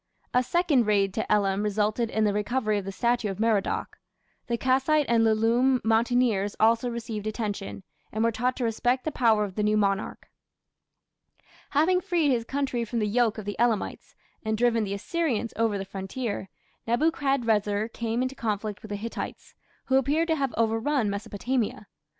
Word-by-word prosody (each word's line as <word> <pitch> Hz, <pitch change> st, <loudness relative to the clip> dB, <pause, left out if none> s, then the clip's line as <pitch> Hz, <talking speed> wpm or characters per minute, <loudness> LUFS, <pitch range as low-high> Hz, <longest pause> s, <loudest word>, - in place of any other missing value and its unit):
A 250 Hz, -, +4 dB
second 285 Hz, -, +2 dB
raid 200 Hz, -2 st, +2 dB
to 220 Hz, -, -3 dB
Elam 200 Hz, -1 st, +2 dB
resulted 210 Hz, +2 st, 0 dB
in 220 Hz, -, 0 dB
the 205 Hz, -1 st, +2 dB
recovery 215 Hz, 0 st, 0 dB
of 195 Hz, -, -8 dB
the 195 Hz, -, -4 dB
statue 235 Hz, +1 st, 0 dB
of 195 Hz, -, -5 dB
Merodach. 220 Hz, -3 st, 0 dB, 0.5 s
The 235 Hz, -, 0 dB
Kassite 270 Hz, +4 st, +2 dB
and 230 Hz, -1 st, +3 dB
Lullume 230 Hz, +4 st, +3 dB
mountaineers 225 Hz, -2 st, +2 dB
also 230 Hz, +2 st, +3 dB
received 225 Hz, -3 st, -5 dB
attention, 210 Hz, -3 st, -4 dB, 0.3 s
and 220 Hz, +1 st, -1 dB
were 230 Hz, -, +3 dB
taught 250 Hz, +3 st, -1 dB
to 255 Hz, -, -3 dB
respect 245 Hz, +3 st, 0 dB
the 310 Hz, -, -1 dB
power 225 Hz, -6 st, +3 dB
of 200 Hz, -2 st, -4 dB
the 210 Hz, -, -2 dB
new 210 Hz, 0 st, +2 dB
monarch. 200 Hz, -1 st, -1 dB, 1.4 s
Having 350 Hz, +6 st, +3 dB
freed 335 Hz, -5 st, +1 dB
his 235 Hz, -3 st, 0 dB
country 270 Hz, -2 st, -1 dB
from 230 Hz, +1 st, -4 dB
the 215 Hz, -, +1 dB
yoke 225 Hz, +1 st, +1 dB
of 215 Hz, -, -6 dB
the 205 Hz, -1 st, -3 dB
Elamites, 235 Hz, -3 st, -1 dB, 0.3 s
and 220 Hz, 0 st, -1 dB
driven 230 Hz, -1 st, +2 dB
the 200 Hz, 0 st, -3 dB
Assyrians 245 Hz, -, -2 dB
over 225 Hz, -2 st, +1 dB
the 195 Hz, -, -4 dB
frontier, 195 Hz, +2 st, -4 dB, 0.4 s
Nebuchadrezzar 230 Hz, -6 st, +1 dB
came 230 Hz, +1 st, -2 dB
into 255 Hz, +1 st, -2 dB
conflict 210 Hz, -5 st, -3 dB
with 215 Hz, -, -10 dB
the 205 Hz, -, -3 dB
Hittites, 225 Hz, +3 st, -6 dB, 0.3 s
who 265 Hz, -, +3 dB
appear 290 Hz, +5 st, +2 dB
to 325 Hz, -1 st, +1 dB
have 275 Hz, -4 st, -1 dB
overrun 225 Hz, +1 st, +1 dB
Mesopotamia. 210 Hz, +3 st, -2 dB
225 Hz, 170 wpm, -26 LUFS, 210-250 Hz, 1.4 s, A